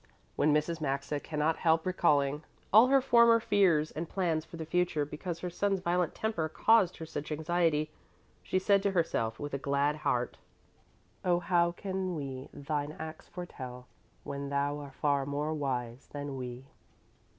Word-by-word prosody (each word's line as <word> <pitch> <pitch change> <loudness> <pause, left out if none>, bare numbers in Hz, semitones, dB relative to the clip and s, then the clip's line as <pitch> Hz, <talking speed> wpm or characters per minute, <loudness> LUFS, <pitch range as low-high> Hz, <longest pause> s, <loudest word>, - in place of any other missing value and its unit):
When 150 - +3
Mrs. 155 +2 0
Maxa 140 +1 -1
cannot 155 +1 -1
help 160 -1 +2
recalling 150 -6 +2 0.3
all 220 +4 +9
her 270 0 +5
former 235 -2 +6
fears 175 -8 +3
and 165 +1 -5
plans 170 -5 0
for 170 - -11
the 160 - -5
future 170 -3 +1
because 165 +3 -6
her 180 - -3
son's 195 +2 0
violent 175 -1 0
temper 215 -8 -1
caused 200 0 +3
her 160 - -6
such 150 -1 -6
anxiety, 160 -1 +1 0.5
she - - -1
said 200 +1 +3
to 200 - +1
herself 115 -10 0
with 145 -1 -5
a 140 - -1
glad 140 +2 +1
heart: 125 -5 -1 0.8
Oh 175 -1 +3
how 175 -1 +2
can 185 -1 -3
we 135 -3 -6
Thine 145 +1 -3
acts 160 0 -8
foretell, 130 -8 -8 0.4
When 140 0 -5
Thou 140 +1 0
are 140 -1 -8
far 140 0 0
more 145 +2 -1
wise 130 -4 -3
than 145 -1 -5
we? 125 0 -6
155 Hz, 160 wpm, -31 LUFS, 140-180 Hz, 0.8 s, all